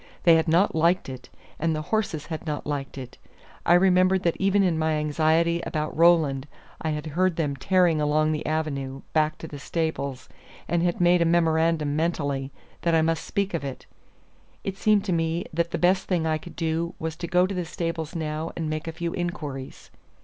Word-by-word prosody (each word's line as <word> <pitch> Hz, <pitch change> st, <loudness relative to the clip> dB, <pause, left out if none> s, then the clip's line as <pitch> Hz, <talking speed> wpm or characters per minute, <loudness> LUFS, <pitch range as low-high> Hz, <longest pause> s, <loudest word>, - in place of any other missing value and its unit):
They 170 Hz, -, +7 dB
had 160 Hz, +1 st, +3 dB
not 170 Hz, +5 st, +3 dB
liked 170 Hz, 0 st, +2 dB
it, 130 Hz, -1 st, -9 dB, 0.3 s
and 160 Hz, 0 st, +1 dB
the 155 Hz, -, -3 dB
horses 195 Hz, -9 st, 0 dB
had 160 Hz, 0 st, -6 dB
not 150 Hz, -1 st, -3 dB
liked 140 Hz, -2 st, -4 dB
it. 130 Hz, -2 st, -9 dB, 0.5 s
I 175 Hz, -, +7 dB
remembered 185 Hz, +1 st, +4 dB
that 170 Hz, -, +1 dB
even 195 Hz, +1 st, +3 dB
in 170 Hz, -4 st, +1 dB
my 160 Hz, 0 st, +1 dB
anxiety 160 Hz, +3 st, +2 dB
about 155 Hz, -2 st, -3 dB
Roland 155 Hz, -5 st, +4 dB, 0.3 s
I 160 Hz, -, -1 dB
had 150 Hz, 0 st, -3 dB
heard 185 Hz, +1 st, +2 dB
them 150 Hz, -4 st, -1 dB
tearing 175 Hz, +1 st, +2 dB
along 155 Hz, +1 st, +2 dB
the 155 Hz, -, -2 dB
avenue 140 Hz, -4 st, -2 dB
back 155 Hz, -1 st, +2 dB
to 160 Hz, -, -8 dB
the 145 Hz, -2 st, -8 dB
stables, 140 Hz, -4 st, -3 dB, 0.4 s
and 175 Hz, -1 st, +1 dB
had 175 Hz, 0 st, 0 dB
made 175 Hz, 0 st, +5 dB
a -, -, +6 dB
memorandum 165 Hz, -3 st, +2 dB
mentally 145 Hz, -4 st, -1 dB, 0.3 s
that 170 Hz, -1 st, +2 dB
I 160 Hz, -, +4 dB
must 165 Hz, 0 st, 0 dB
speak 200 Hz, -2 st, -1 dB
of 165 Hz, -, -2 dB
it. 135 Hz, -2 st, -6 dB, 0.8 s
It 195 Hz, -, -3 dB
seemed 205 Hz, 0 st, +2 dB
to 185 Hz, -, 0 dB
me 165 Hz, +1 st, 0 dB
that 170 Hz, +1 st, 0 dB
the -, -, -2 dB
best 185 Hz, +2 st, +2 dB
thing 175 Hz, -4 st, 0 dB
I 155 Hz, -1 st, 0 dB
could 175 Hz, -, -12 dB
do 165 Hz, +1 st, -2 dB
was 160 Hz, 0 st, -4 dB
to 170 Hz, -, -5 dB
go 180 Hz, +1 st, +3 dB
to 190 Hz, -, -3 dB
the 180 Hz, -1 st, -2 dB
stables 165 Hz, -1 st, -4 dB
now 155 Hz, 0 st, -3 dB
and 165 Hz, -2 st, -2 dB
make 155 Hz, +1 st, -4 dB
a -, -, -2 dB
few 170 Hz, +1 st, -3 dB
inquiries. 150 Hz, -7 st, -5 dB
160 Hz, 200 wpm, -25 LUFS, 155-175 Hz, 0.8 s, They